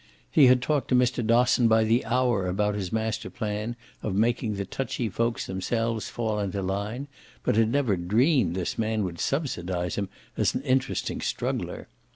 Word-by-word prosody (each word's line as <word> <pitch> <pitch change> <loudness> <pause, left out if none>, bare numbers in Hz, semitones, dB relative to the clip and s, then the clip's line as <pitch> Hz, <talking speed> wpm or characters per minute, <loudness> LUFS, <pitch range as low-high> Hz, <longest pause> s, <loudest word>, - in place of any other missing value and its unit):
He 145 -4 +7
had 125 0 +5
talked 145 -2 0
to 125 - +2
Mr. 125 -1 +2
Dosson 120 +1 +4
by 110 0 +4
the 115 +3 +2
hour 120 -6 +1
about 105 +3 0
his 95 -3 -3
master 110 -1 -2
plan 110 -1 -3 0.3
of 100 -3 -2
making 110 0 +1
the 100 0 -3
touchy 120 +2 -3
folks 115 +4 -1
themselves 115 +4 -2
fall 110 -3 -2
into 100 -1 -2
line, 100 +8 -3 0.4
but - - +1
had 110 0 +4
never 130 -7 +2
dreamed 105 - +2
this 95 +2 -3
man 110 -1 0
would 85 -3 -4
subsidise 90 - -2
him 100 -2 -2 0.3
as - - +1
an - - -1
interesting 130 -2 0
struggler. - - -3
110 Hz, 175 wpm, -26 LUFS, 100-125 Hz, 0.4 s, He